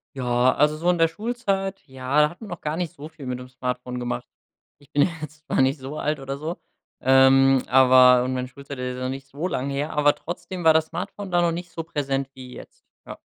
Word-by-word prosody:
Ja, 125 Hz, -1 st, +2 dB
also 150 Hz, +1 st, +3 dB
so 165 Hz, +3 st, 0 dB
in 180 Hz, -, +3 dB
der 165 Hz, 0 st, +4 dB
Schulzeit, 195 Hz, -1 st, -3 dB
ja, 130 Hz, +2 st, -1 dB
da 150 Hz, -, +4 dB
hatten 175 Hz, +7 st, -13 dB
wir -, -, -10 dB
noch 175 Hz, -, -6 dB
gar 150 Hz, +1 st, -3 dB
nicht 175 Hz, -1 st, -3 dB
so 150 Hz, -3 st, -10 dB
viel 160 Hz, -3 st, -12 dB
mit 125 Hz, -1 st, -3 dB
dem 125 Hz, -, -9 dB
Smartphone 125 Hz, -1 st, -4 dB
gemacht. 120 Hz, 0 st, -4 dB, 0.5 s
Ich 145 Hz, 0 st, -24 dB
bin 145 Hz, -1 st, +4 dB
ja -, -, +2 dB
jetzt 155 Hz, +1 st, -10 dB
noch -, -, +2 dB
nicht 135 Hz, +3 st, +2 dB
so 135 Hz, +3 st, -7 dB
alt 150 Hz, 0 st, -1 dB
oder 135 Hz, 0 st, -5 dB
so, 160 Hz, +4 st, -5 dB, 0.4 s
ähm, 135 Hz, 0 st, +5 dB
aber 125 Hz, -1 st, +6 dB
und 130 Hz, -, -2 dB
meine 125 Hz, 0 st, -3 dB
Schulzeit 140 Hz, +1 st, -10 dB
ist 125 Hz, 0 st, -4 dB
ja 130 Hz, -, -5 dB
noch 130 Hz, -, -1 dB
nicht 135 Hz, +1 st, -6 dB
so 145 Hz, +6 st, -4 dB
lang 135 Hz, -6 st, -2 dB
her, 140 Hz, +3 st, -3 dB
aber 145 Hz, -1 st, +4 dB
trotzdem 175 Hz, +1 st, -7 dB
war 160 Hz, -, +7 dB
das 160 Hz, 0 st, +2 dB
Smartphone 190 Hz, +3 st, -6 dB
da 175 Hz, 0 st, +3 dB
noch 170 Hz, -1 st, +2 dB
nicht 175 Hz, 0 st, -6 dB
so 165 Hz, 0 st, -5 dB
präsent 140 Hz, -4 st, -2 dB
wie 130 Hz, -2 st, -11 dB
jetzt, -, -, -14 dB, 0.2 s
ja. -, -, -8 dB
145 Hz, 245 wpm, -24 LUFS, 130-165 Hz, 0.5 s, war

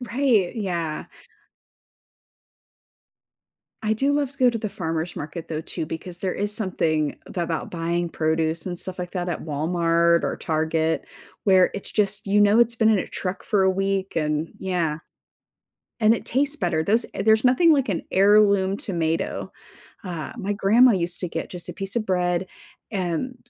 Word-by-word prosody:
Right. 240 Hz, -5 st, +1 dB
Yeah. 170 Hz, -7 st, -3 dB, 2.8 s
I 215 Hz, 0 st, +1 dB
do 275 Hz, +6 st, +1 dB
love 285 Hz, -2 st, 0 dB
to 275 Hz, -, -18 dB
go 250 Hz, -1 st, +5 dB
to 230 Hz, -, -3 dB
the 215 Hz, -, -3 dB
farmer's 165 Hz, -4 st, -3 dB
market 160 Hz, +3 st, -6 dB
though 155 Hz, -1 st, -3 dB
too, 160 Hz, -, -4 dB
because 175 Hz, +2 st, -6 dB
there 185 Hz, 0 st, -2 dB
is 205 Hz, +1 st, -1 dB
something 160 Hz, -7 st, 0 dB
about 170 Hz, -3 st, -3 dB
buying 170 Hz, 0 st, -1 dB
produce 160 Hz, +1 st, -1 dB
and 175 Hz, -1 st, -3 dB
stuff 185 Hz, -1 st, -5 dB
like 180 Hz, 0 st, -5 dB
that 180 Hz, -1 st, -3 dB
at 170 Hz, -, -4 dB
Walmart 170 Hz, +2 st, +2 dB
or -, -, -2 dB
Target 160 Hz, 0 st, 0 dB, 0.4 s
where 190 Hz, -2 st, +5 dB
it's 200 Hz, -, -6 dB
just, 205 Hz, -1 st, +1 dB
you 205 Hz, +1 st, +3 dB
know 205 Hz, +2 st, +5 dB
it's 235 Hz, 0 st, +4 dB
been 220 Hz, -1 st, +3 dB
in 215 Hz, -3 st, +4 dB
a -, -, -2 dB
truck 185 Hz, 0 st, -5 dB
for 205 Hz, -3 st, +2 dB
a 190 Hz, -, +4 dB
week 195 Hz, -1 st, -1 dB
and 150 Hz, 0 st, -1 dB
yeah. 170 Hz, -5 st, -1 dB, 1.0 s
And 220 Hz, +2 st, +6 dB
it -, -, -5 dB
tastes 285 Hz, +4 st, 0 dB
better. 170 Hz, -5 st, 0 dB
Those 220 Hz, +7 st, +2 dB
there's 220 Hz, +2 st, +2 dB
nothing 290 Hz, +7 st, +5 dB
like 270 Hz, -7 st, +1 dB
an 170 Hz, -, -2 dB
heirloom 200 Hz, -1 st, +4 dB
tomato. 165 Hz, -4 st, -2 dB, 0.5 s
Uh, 170 Hz, -6 st, -5 dB
my 205 Hz, +2 st, -2 dB
grandma 225 Hz, +5 st, +5 dB
used 175 Hz, -2 st, 0 dB
to 180 Hz, -, -2 dB
get 165 Hz, -, -5 dB
just 180 Hz, -2 st, -6 dB
a -, -, -6 dB
piece 195 Hz, +1 st, -6 dB
of 225 Hz, -2 st, -1 dB
bread 180 Hz, 0 st, 0 dB, 0.4 s
and 190 Hz, +5 st, -2 dB
185 Hz, 170 wpm, -24 LUFS, 165-215 Hz, 2.8 s, And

